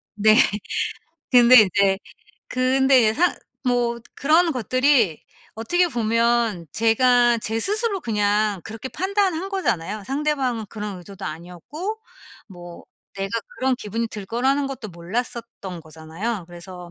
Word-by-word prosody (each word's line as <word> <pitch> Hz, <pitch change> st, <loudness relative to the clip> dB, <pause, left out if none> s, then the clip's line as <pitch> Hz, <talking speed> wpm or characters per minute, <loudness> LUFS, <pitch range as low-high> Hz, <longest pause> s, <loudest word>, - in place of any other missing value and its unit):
네. 215 Hz, +1 st, +5 dB, 1.0 s
근데 245 Hz, 0 st, +8 dB
인제 195 Hz, -1 st, +2 dB, 0.5 s
근데 260 Hz, 0 st, +3 dB
이제 215 Hz, -1 st, +3 dB
상 355 Hz, +6 st, +2 dB, 0.3 s
뭐 240 Hz, -1 st, +1 dB, 0.2 s
그런 325 Hz, +4 st, +3 dB
것들이 255 Hz, -, +2 dB, 0.3 s
어떻게 350 Hz, +11 st, +1 dB
보면 230 Hz, -, +1 dB
제가 240 Hz, +1 st, +3 dB
제 220 Hz, +1 st, -2 dB
스스로 415 Hz, -, 0 dB
그냥 210 Hz, -2 st, 0 dB
그렇게 225 Hz, +4 st, -7 dB
판단한 380 Hz, -1 st, -1 dB
거잖아요. 210 Hz, -, -2 dB
상대방은 270 Hz, -5 st, -1 dB
그런 210 Hz, -2 st, -6 dB
의도도 190 Hz, +2 st, -10 dB
아니었고 180 Hz, -, -6 dB, 0.5 s
뭐 175 Hz, -3 st, -12 dB, 0.3 s
내가 195 Hz, 0 st, -3 dB, 0.3 s
그런 260 Hz, 0 st, +1 dB
기분이 230 Hz, 0 st, -3 dB
들 210 Hz, -3 st, -8 dB
거라는 265 Hz, +6 st, 0 dB
것도 260 Hz, -5 st, -7 dB
몰랐었던 190 Hz, 0 st, -5 dB
거잖아요. 165 Hz, +6 st, -6 dB
그래서 175 Hz, 0 st, -11 dB
230 Hz, 275 characters per minute, -22 LUFS, 195-265 Hz, 1.0 s, 근데